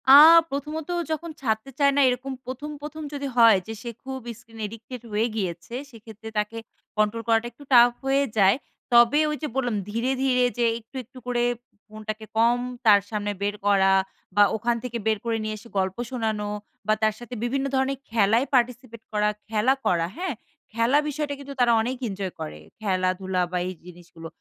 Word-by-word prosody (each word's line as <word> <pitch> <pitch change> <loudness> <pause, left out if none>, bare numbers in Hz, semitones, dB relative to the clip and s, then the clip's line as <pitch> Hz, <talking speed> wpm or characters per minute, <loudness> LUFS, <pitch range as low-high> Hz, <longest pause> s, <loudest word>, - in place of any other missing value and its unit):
আ - - +10 0.4
প্রথমত 300 +3 -4 0.2
যখন 320 +2 -3
ছাড়তে 220 0 -1
চায় 280 -1 +5
না 285 - +4
এরকম 255 +2 -3
১ম 260 +4 -6
১ম 305 +1 -7
যদি 285 -1 -3
হয় 230 -3 +8
যে 225 - -4
সে 240 - -5
খুব 265 0 -5 0.2
স্ক্রিন 225 -2 -15
অ্যাডিক্টেড 225 +3 -7
হয়ে 215 +3 +1
গিয়েছে 185 +1 -4 0.2
সেক্ষেত্রে 220 -1 -11
তাকে 210 +2 -1 0.4
কন্ট্রোল 215 +2 +1
করাটা 225 +1 +3
একটু 265 +5 -15
tough 240 0 +7
হয়ে 275 +1 +3
যায়। 195 -1 +6 0.4
তবে 240 +5 +6
ওই 300 - -2
যে - - 0
বললাম 245 -4 0
ধীরে, 230 +5 -1
ধীরে 250 -2 +3
যে 240 - +2
একটু, 225 +4 -23
একটু 255 +3 -18
করে 240 -1 +1 0.4
ফোনটাকে 215 0 -6
কম 235 +2 +4 0.3
তার 205 -2 +8
সামনে 205 -1 -2
বের 205 +1 0
করা 195 -1 +5 0.4
বা 205 - +7
ওখান 235 +2 0
থেকে 245 -2 -3
বের 220 -1 +3
করে 230 -1 0
নিয়ে 215 0 -3
এসে 225 +3 -14
গল্প 190 0 0
শোনানো 220 -5 -2 0.4
বা 215 - +4
তার 215 0 +3
সাথে 240 +1 -9
বিভিন্ন 270 +3 0
ধরণের 265 0 0
খেলায় 225 +3 +3
পার্টিসিপেট 245 -2 0
করা, 210 -1 +2 0.2
খেলা 220 +4 +3
করা। 170 -2 +2
হ্যাঁ? 360 -6 -2 0.4
খেলা 230 +5 +3
বিষয়টা 295 0 -3
কিন্তু 280 0 -8
তারা 245 -1 +5
অনেক 250 +3 -2
এনজয় 195 -2 -4
করে। 75 0 -6 0.2
খেলাধুলা 185 -2 0
বা 180 - -1
এই 185 - -4
জিনিসগুলো। 170 -2 -11
230 Hz, 180 wpm, -25 LUFS, 210-255 Hz, 0.4 s, আ